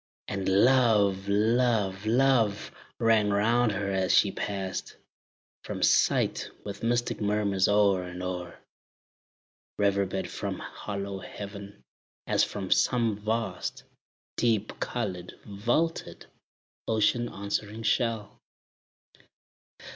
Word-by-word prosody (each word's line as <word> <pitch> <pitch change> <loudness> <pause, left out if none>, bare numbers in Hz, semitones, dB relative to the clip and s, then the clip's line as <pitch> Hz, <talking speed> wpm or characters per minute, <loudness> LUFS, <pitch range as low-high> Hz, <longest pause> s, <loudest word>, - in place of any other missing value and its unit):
And 95 -2 -2
"love, 100 -3 +4
love, 110 -2 +1
love," 115 -4 +2 0.3
rang 110 -2 +3
round 115 +3 +2
her 100 0 -2
as 95 -1 +1
she - - +4
passed 95 -2 -4 0.7
From - - -4
sight, - - +2 0.2
with 100 -1 -6
mystic 120 0 0
murmurs 100 -2 +1
o'er 100 -2 +3
and 90 0 -7
o'er 90 -1 -5 1.2
Reverbed 100 -1 0
from - - -4
hollow 100 -1 -6
heaven, 100 +1 -9 0.4
as - - +2
from 95 -2 -4
some 115 -4 +2
vast, 110 +2 -3 0.5
Deep 110 -3 0
colored, 95 -7 -4
vaulted, 120 +11 -1 0.6
ocean 115 +2 +1
answering 105 +2 -4
shell. 115 -3 -1
105 Hz, 95 wpm, -28 LUFS, 100-115 Hz, 1.2 s, love